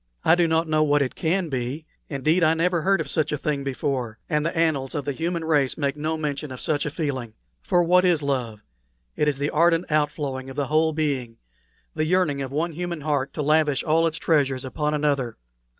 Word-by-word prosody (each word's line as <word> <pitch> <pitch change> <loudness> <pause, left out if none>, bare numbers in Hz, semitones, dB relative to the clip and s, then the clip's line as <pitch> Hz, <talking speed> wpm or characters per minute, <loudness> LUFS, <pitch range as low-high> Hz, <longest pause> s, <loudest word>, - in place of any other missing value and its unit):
I 160 - +6
do 175 -1 +3
not 160 +1 +1
know 155 -1 +2
what 145 -1 +3
it 130 - -4
can 175 +2 0
be 130 +4 -3 0.2
indeed, 155 +5 +1
I 160 0 +4
never 170 +1 +1
heard 195 +2 +2
of 160 - -3
such 155 +1 0
a 150 - 0
thing 140 0 -2
before, 130 -4 -2
and 150 -2 0
the 165 +2 -2
annals 155 -5 +1
of 145 - -3
the 145 - -1
human 165 +3 -2
race 145 -5 +2
make 140 -2 -1
no 155 +2 -2
mention 150 -1 -3
of 130 - -7
such 150 -1 0
a - - 0
feeling. 140 -7 -3 0.3
For 175 0 +2
what 180 +2 +4
is 175 -5 +2
love? 125 -6 -2 0.5
It 150 - +1
is 145 -2 +1
the 145 +1 -1
ardent 165 +1 +2
outflow 150 -3 0
of 130 0 -9
the 145 -1 -1
whole 155 +3 +2
being 140 -7 -2 0.6
the 155 - -1
yearning 160 -5 +1
of 135 -1 -4
one 160 +4 -1
human 170 0 -4
heart 145 -2 -1
to 150 - -2
lavish 150 -2 +2
all 165 +1 +3
its 165 - -3
treasures 140 -5 +1
upon 150 +3 -1
another. 140 -5 0
150 Hz, 215 wpm, -24 LUFS, 140-160 Hz, 0.6 s, I